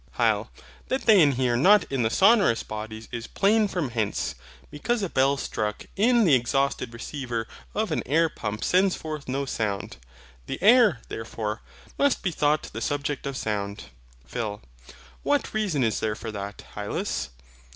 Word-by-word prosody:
HYL. -, -, +2 dB, 0.4 s
That 265 Hz, -, -2 dB
they 215 Hz, -5 st, +7 dB
inhere 130 Hz, -5 st, +3 dB
not 190 Hz, +10 st, +6 dB
in 135 Hz, -2 st, 0 dB
the 110 Hz, -, +2 dB
sonorous 195 Hz, -, +4 dB
bodies 110 Hz, +1 st, -7 dB
is 115 Hz, -1 st, -5 dB
plain 210 Hz, +2 st, +3 dB
from 175 Hz, -9 st, -2 dB
hence: 105 Hz, -, -1 dB, 0.4 s
because 220 Hz, +9 st, -1 dB
a 190 Hz, -, -1 dB
bell 135 Hz, 0 st, +2 dB
struck 105 Hz, -5 st, -3 dB
in 235 Hz, +3 st, +4 dB
the 160 Hz, -, +5 dB
exhausted 130 Hz, 0 st, +1 dB
receiver 120 Hz, -1 st, -4 dB, 0.3 s
of 215 Hz, +1 st, 0 dB
an -, -, 0 dB
air 165 Hz, +4 st, +3 dB
pump 105 Hz, -8 st, -5 dB
sends 185 Hz, +1 st, +3 dB
forth 155 Hz, -2 st, -6 dB
no 140 Hz, +2 st, -1 dB
sound. 105 Hz, -, -3 dB, 0.5 s
The -, -, -4 dB
air, 210 Hz, -, +5 dB
therefore, 110 Hz, -1 st, -4 dB, 0.4 s
must 285 Hz, -2 st, +2 dB
be 190 Hz, -, 0 dB
thought 150 Hz, -1 st, +1 dB
the -, -, -5 dB
subject 145 Hz, -1 st, -2 dB
of 140 Hz, -2 st, -4 dB
sound. 100 Hz, -2 st, -4 dB, 0.3 s
PHIL. 105 Hz, -, -4 dB, 0.6 s
What 290 Hz, -1 st, 0 dB
reason 195 Hz, -11 st, 0 dB
is 110 Hz, -2 st, +1 dB
there 110 Hz, -1 st, -1 dB
for 110 Hz, +1 st, -6 dB
that, 100 Hz, -1 st, -6 dB
Hylas? -, -, -3 dB
135 Hz, 160 wpm, -26 LUFS, -, 0.6 s, they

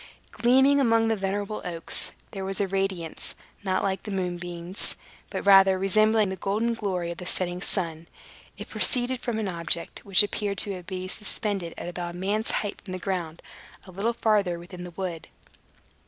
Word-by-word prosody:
Gleaming 265 Hz, +4 st, +4 dB
among 230 Hz, -3 st, +3 dB
the 225 Hz, -, +2 dB
venerable 205 Hz, +1 st, -2 dB
oaks, 170 Hz, -2 st, -3 dB, 0.2 s
there 195 Hz, -2 st, -5 dB
was 195 Hz, 0 st, -3 dB
a 200 Hz, -, +1 dB
radiance, 190 Hz, -4 st, 0 dB, 0.3 s
not 185 Hz, -1 st, 0 dB
like 190 Hz, -1 st, 0 dB
the -, -, -8 dB
moonbeams, 175 Hz, -1 st, 0 dB, 0.3 s
but -, -, -4 dB
rather 195 Hz, -1 st, +7 dB
resembling 215 Hz, +2 st, +3 dB
the 190 Hz, -, -3 dB
golden 215 Hz, +6 st, 0 dB
glory 185 Hz, -6 st, -2 dB
of 170 Hz, -, -7 dB
the 180 Hz, -, -6 dB
setting 180 Hz, -1 st, +1 dB
sun. 165 Hz, -4 st, -2 dB, 0.5 s
It -, -, -7 dB
proceeded 250 Hz, 0 st, +2 dB
from 240 Hz, -3 st, -2 dB
an 220 Hz, -2 st, -1 dB
object, 170 Hz, -1 st, -1 dB
which 195 Hz, 0 st, +5 dB
appeared 205 Hz, -1 st, -2 dB
to 195 Hz, -2 st, -2 dB
be 185 Hz, 0 st, -5 dB
suspended 195 Hz, -3 st, -2 dB
at -, -, -6 dB
about 175 Hz, -1 st, -5 dB
a -, -, -7 dB
man's 205 Hz, +4 st, -1 dB
height 205 Hz, -1 st, -2 dB
from 185 Hz, -, -8 dB
the -, -, -2 dB
ground, 175 Hz, -4 st, -3 dB, 0.4 s
a 185 Hz, -, -11 dB
little 205 Hz, +6 st, -1 dB
farther 205 Hz, -6 st, +2 dB
within 175 Hz, +1 st, -9 dB
the -, -, -7 dB
wood. 175 Hz, -4 st, -4 dB
195 Hz, 175 wpm, -26 LUFS, 180-210 Hz, 0.5 s, rather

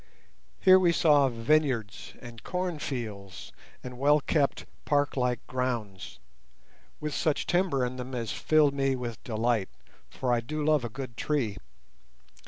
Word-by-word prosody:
Here 185 Hz, -1 st, +7 dB
we 175 Hz, -2 st, +4 dB
saw 145 Hz, -5 st, +4 dB
vineyards 120 Hz, -3 st, 0 dB
and 120 Hz, -2 st, -10 dB
corn 180 Hz, -3 st, -3 dB
fields 105 Hz, -9 st, -6 dB, 0.3 s
and 125 Hz, -1 st, -8 dB
well 145 Hz, +2 st, +4 dB
kept 145 Hz, -1 st, 0 dB, 0.2 s
park 145 Hz, -1 st, +1 dB
like 125 Hz, -2 st, -1 dB
grounds, 115 Hz, -, -4 dB, 0.8 s
with 150 Hz, -1 st, -4 dB
such 155 Hz, -2 st, 0 dB
timber 175 Hz, -8 st, +1 dB
in 125 Hz, +1 st, -5 dB
them 125 Hz, +1 st, -6 dB
as 115 Hz, -5 st, -3 dB
filled 145 Hz, -, +3 dB
me 135 Hz, -1 st, +1 dB
with 120 Hz, -3 st, -6 dB
delight, 115 Hz, -2 st, 0 dB, 0.4 s
for 125 Hz, -2 st, -1 dB
I 120 Hz, -, +2 dB
do 150 Hz, +6 st, -4 dB
love 150 Hz, -4 st, +3 dB
a 120 Hz, -, -3 dB
good 125 Hz, -1 st, -8 dB
tree. 120 Hz, -10 st, -1 dB
130 Hz, 145 wpm, -28 LUFS, 115-150 Hz, 0.8 s, Here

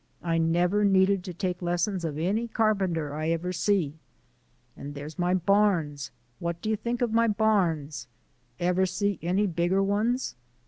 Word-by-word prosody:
I 165 Hz, -1 st, +1 dB
never 175 Hz, +5 st, +2 dB
needed 195 Hz, -1 st, +3 dB
to 180 Hz, -, -5 dB
take 180 Hz, 0 st, -3 dB
lessons 175 Hz, +2 st, -1 dB
of 155 Hz, -3 st, -3 dB
any 200 Hz, +9 st, 0 dB
carpenter 190 Hz, -10 st, 0 dB
I 155 Hz, +2 st, -2 dB
ever 170 Hz, +2 st, -1 dB
see. 175 Hz, -6 st, 0 dB, 0.8 s
And 145 Hz, +1 st, -8 dB
there's 145 Hz, +3 st, -8 dB
my 180 Hz, +1 st, +2 dB
barns. 175 Hz, -7 st, +1 dB, 0.3 s
What 170 Hz, 0 st, -3 dB
do 215 Hz, -, -2 dB
you -, -, +2 dB
think 235 Hz, +3 st, -2 dB
o' -, -, +3 dB
my 230 Hz, +1 st, +3 dB
barns? 170 Hz, -, +1 dB, 0.5 s
Ever 180 Hz, +2 st, +2 dB
see 200 Hz, 0 st, -1 dB
any 185 Hz, +5 st, +1 dB
bigger 175 Hz, +2 st, +1 dB
ones? 220 Hz, +6 st, 0 dB
180 Hz, 155 wpm, -27 LUFS, 165-205 Hz, 0.8 s, needed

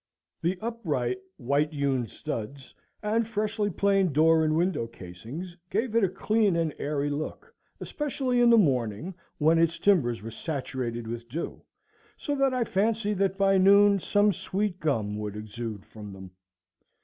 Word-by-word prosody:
The 180 Hz, +3 st, 0 dB
upright 150 Hz, -, -2 dB, 0.2 s
white 140 Hz, +4 st, +1 dB
hewn 135 Hz, -4 st, 0 dB
studs 125 Hz, +6 st, -6 dB, 0.3 s
and 220 Hz, +2 st, +1 dB
freshly 215 Hz, -1 st, -1 dB
planed 195 Hz, -3 st, +2 dB
door 160 Hz, +2 st, +5 dB
and 155 Hz, 0 st, +1 dB
window 170 Hz, -9 st, 0 dB
casings 115 Hz, -, -9 dB
gave 220 Hz, +5 st, -1 dB
it 230 Hz, -, +4 dB
a 190 Hz, -, +3 dB
clean 205 Hz, +1 st, +1 dB
and 165 Hz, -3 st, 0 dB
airy 145 Hz, 0 st, -1 dB
look, 155 Hz, -, -5 dB, 0.3 s
especially 265 Hz, -4 st, -1 dB
in 240 Hz, -, +6 dB
the 235 Hz, -, +7 dB
morning, 135 Hz, -, +1 dB, 0.2 s
when 160 Hz, +2 st, +4 dB
its 165 Hz, 0 st, +2 dB
timbers 125 Hz, -, +2 dB
were 115 Hz, -, -6 dB
saturated 125 Hz, -3 st, -4 dB
with 115 Hz, +1 st, -6 dB
dew, 160 Hz, +7 st, -5 dB, 0.6 s
so 290 Hz, -, -3 dB
that 275 Hz, -1 st, +3 dB
I 255 Hz, -1 st, +1 dB
fancied 210 Hz, 0 st, 0 dB
that 195 Hz, -1 st, +1 dB
by 195 Hz, -1 st, +4 dB
noon 200 Hz, +1 st, +6 dB
some 205 Hz, +2 st, +2 dB
sweet 190 Hz, +2 st, -2 dB
gum 110 Hz, -9 st, -1 dB
would 105 Hz, -1 st, -4 dB
exude 105 Hz, -1 st, -6 dB
from 105 Hz, -2 st, -10 dB
them. 95 Hz, -1 st, -11 dB
165 Hz, 155 wpm, -27 LUFS, 120-205 Hz, 0.6 s, the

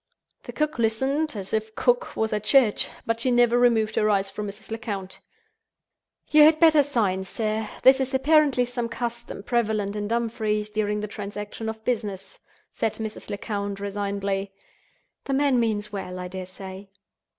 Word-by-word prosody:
The -, -, -6 dB
cook 305 Hz, -3 st, -2 dB
listened 265 Hz, +7 st, 0 dB
as 195 Hz, -2 st, -6 dB
if 220 Hz, 0 st, 0 dB
the -, -, -24 dB
cook 245 Hz, -1 st, +1 dB
was 220 Hz, 0 st, 0 dB
at 210 Hz, -1 st, -1 dB
church: 235 Hz, -2 st, +4 dB, 0.2 s
but 230 Hz, 0 st, -1 dB
she 255 Hz, -, 0 dB
never 240 Hz, -1 st, +4 dB
removed 225 Hz, -3 st, +3 dB
her 215 Hz, -, +2 dB
eyes 195 Hz, -1 st, +1 dB
from 210 Hz, +1 st, -5 dB
Mrs. 200 Hz, +1 st, -10 dB
Lecount. 205 Hz, -4 st, -5 dB, 1.1 s
"You 305 Hz, -, +7 dB
had 310 Hz, +1 st, +7 dB
better 315 Hz, -3 st, +7 dB
sign, 215 Hz, -9 st, 0 dB
sir. 215 Hz, +2 st, -2 dB
This 265 Hz, +1 st, +7 dB
is 265 Hz, -1 st, -1 dB
apparently 280 Hz, -2 st, +4 dB
some 240 Hz, -1 st, -4 dB
custom 235 Hz, -3 st, -5 dB
prevalent 215 Hz, -4 st, 0 dB
in 205 Hz, 0 st, -3 dB
Dumfries 220 Hz, -2 st, -1 dB
during 210 Hz, -1 st, -1 dB
the 210 Hz, -, -3 dB
transaction 205 Hz, +2 st, -6 dB
of 220 Hz, 0 st, -8 dB
business," 210 Hz, -6 st, -3 dB, 0.3 s
said 225 Hz, -, -1 dB
Mrs. 220 Hz, -1 st, -6 dB
Lecount, 200 Hz, -1 st, -3 dB
resignedly. 200 Hz, -1 st, -2 dB, 0.7 s
"The 275 Hz, -, -2 dB
man 275 Hz, -2 st, +3 dB
means 210 Hz, -2 st, -1 dB
well, 185 Hz, -2 st, -5 dB
I 180 Hz, 0 st, -5 dB
dare 185 Hz, 0 st, -6 dB
say." 190 Hz, +1 st, -10 dB
220 Hz, 165 wpm, -25 LUFS, 200-240 Hz, 1.1 s, You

